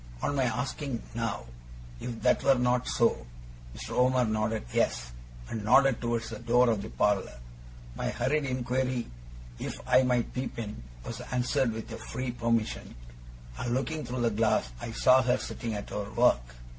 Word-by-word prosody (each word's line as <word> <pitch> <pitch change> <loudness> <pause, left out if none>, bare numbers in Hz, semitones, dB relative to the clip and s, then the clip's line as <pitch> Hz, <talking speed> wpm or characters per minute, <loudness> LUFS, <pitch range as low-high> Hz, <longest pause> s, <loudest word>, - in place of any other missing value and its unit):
On - - +1
my 135 -2 +2
asking 125 +1 -2
now, 115 -3 -2 0.5
if 120 -2 -6
that - - +4
were 135 - +5
not 125 0 +1
so, 115 - +2 0.5
Mr. - - -7
Omer 125 0 +3
nodded 110 - -1
yes, - - +1 0.4
and 110 -2 -4
nodded 130 +3 +5
towards 120 -1 -1
the 110 - -6
door 120 +1 +4
of 105 -3 0
the 110 - -6
parlour. 100 - +1 0.6
My - - -2
hurried 140 +4 0
inquiry 130 -1 -1 0.5
if - - -5
I - - +6
might 125 -2 +1
peep 130 0 -4
in, 105 - -5 0.2
was - - -5
answered 125 0 +1
with 110 0 -6
a - - -5
free 130 -1 -4
permission; 115 -2 -1 0.6
and, 120 0 -1
looking 155 +4 -2
through 125 0 -3
the 115 -1 +2
glass, 105 - +1
I - - -4
saw 130 +3 +5
her 125 0 +2
sitting 115 -2 -4
at 105 - -6
her 100 -1 -3
work. 60 - +2
120 Hz, 170 wpm, -29 LUFS, 110-125 Hz, 0.6 s, I